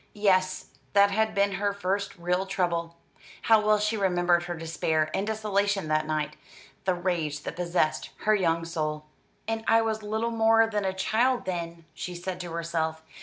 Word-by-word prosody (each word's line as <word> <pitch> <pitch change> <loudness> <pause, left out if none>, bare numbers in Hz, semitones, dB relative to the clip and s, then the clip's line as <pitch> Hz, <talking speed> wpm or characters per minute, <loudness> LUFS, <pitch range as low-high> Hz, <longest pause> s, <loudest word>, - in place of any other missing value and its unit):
Yes, 185 -2 +1 0.2
that 200 0 +5
had 220 +2 +1
been 200 0 +3
her 200 +1 -1
first 200 +1 -2
real 180 +2 -1
trouble, 170 -3 -1 0.5
How 220 -1 +5
well 215 0 +4
she 210 +2 0
remembered 175 -3 +2
her 175 0 -4
despair 160 -1 -1
and 200 - -1
desolation 205 -4 0
that 155 0 +1
night, 150 -1 -2 0.5
the 185 -1 +2
rage 165 -5 -2
that - - -5
possessed 175 -2 0
her 215 - +3
young 165 -5 +1
soul. 155 -2 -3 0.4
"And 225 0 -2
I 225 0 +5
was 220 -1 -1
little 220 +2 -2
more 225 0 +4
than 210 -3 -2
a 190 - 0
child, 235 +5 +1
then," 170 -2 -4
she 180 - -6
said 180 +1 -5
to 175 -2 -6
herself. 160 -1 -2
185 Hz, 170 wpm, -27 LUFS, 170-210 Hz, 0.5 s, that